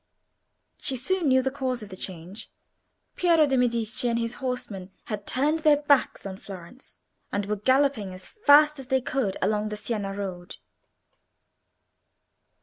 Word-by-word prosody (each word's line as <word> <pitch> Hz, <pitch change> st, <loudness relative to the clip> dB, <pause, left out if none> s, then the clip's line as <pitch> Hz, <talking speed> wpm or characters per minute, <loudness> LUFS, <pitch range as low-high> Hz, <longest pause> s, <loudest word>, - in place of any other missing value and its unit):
She 270 Hz, -, -1 dB
soon 330 Hz, +7 st, 0 dB
knew 260 Hz, -1 st, +4 dB
the 265 Hz, -, 0 dB
cause 255 Hz, -4 st, -3 dB
of 205 Hz, -, -10 dB
the 190 Hz, -, -8 dB
change. 185 Hz, +2 st, -8 dB, 0.7 s
Piero 335 Hz, -3 st, +4 dB
de' 270 Hz, -2 st, +1 dB
Medici 235 Hz, -1 st, +1 dB
and 230 Hz, -, +1 dB
his 230 Hz, 0 st, -2 dB
horsemen 220 Hz, -7 st, -4 dB
had 205 Hz, -2 st, -6 dB
turned 295 Hz, +5 st, +1 dB
their 305 Hz, -2 st, +5 dB
backs 285 Hz, -6 st, +2 dB
on 190 Hz, -1 st, -5 dB
Florence, 195 Hz, +7 st, -11 dB, 0.3 s
and 205 Hz, 0 st, -1 dB
were 210 Hz, +1 st, -1 dB
galloping 260 Hz, -3 st, +2 dB
as 185 Hz, 0 st, -9 dB
fast 300 Hz, -6 st, +5 dB
as 265 Hz, -, -9 dB
they 265 Hz, 0 st, +2 dB
could 250 Hz, -6 st, -1 dB
along 215 Hz, 0 st, +1 dB
the 210 Hz, -, -5 dB
Siena 210 Hz, -3 st, -3 dB
road. 185 Hz, -3 st, -6 dB
240 Hz, 150 wpm, -26 LUFS, 200-275 Hz, 0.7 s, their